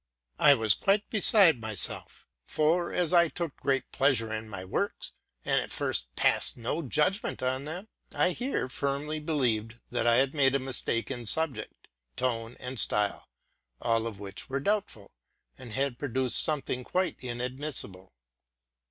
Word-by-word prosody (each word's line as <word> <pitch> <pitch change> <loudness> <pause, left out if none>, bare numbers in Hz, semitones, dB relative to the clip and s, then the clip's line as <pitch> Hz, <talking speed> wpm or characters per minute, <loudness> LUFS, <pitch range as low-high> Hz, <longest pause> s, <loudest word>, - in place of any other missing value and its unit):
I 145 -1 +8
was 110 -4 +3
quite 200 +1 +1
beside 190 - +6
myself; 110 -2 0 0.2
for 165 +3 +1
as 175 -1 +1
I 170 -1 +6
took 165 -2 -5
'creat 135 -2 0
pleasure 125 -5 +2
in 110 0 -5
my 95 -3 -6
works, 95 - -3 0.3
but - - +2
at - - -6
first - - -2
passed - - +4
no 125 +7 -2
judgment 150 - 0
on 130 +2 -1
them, 175 +7 -7 0.2
I 180 - +2
here 245 - -2
firmly 140 +4 -3
believed 120 -8 -1
that 120 -1 0
I 115 - +5
had 135 +2 +2
made 135 -3 +3
a - - +2
mistake 130 -2 -2
in 120 -3 -6
subject, 140 -5 -3 0.3
tone, 115 -2 -2
and 125 -1 -5
style, 105 -1 0 0.3
— - - -52
all 115 -1 0
of 105 -4 -8
which 100 +3 -9
were 135 +1 -1
doubtful, 185 - -2 0.4
—and 120 -4 -10
had 135 -2 -2
produced 130 -2 +2
something 140 -4 -2
quite 185 +7 -1
inadmissible. 125 -6 -4
130 Hz, 155 wpm, -28 LUFS, 115-155 Hz, 0.4 s, I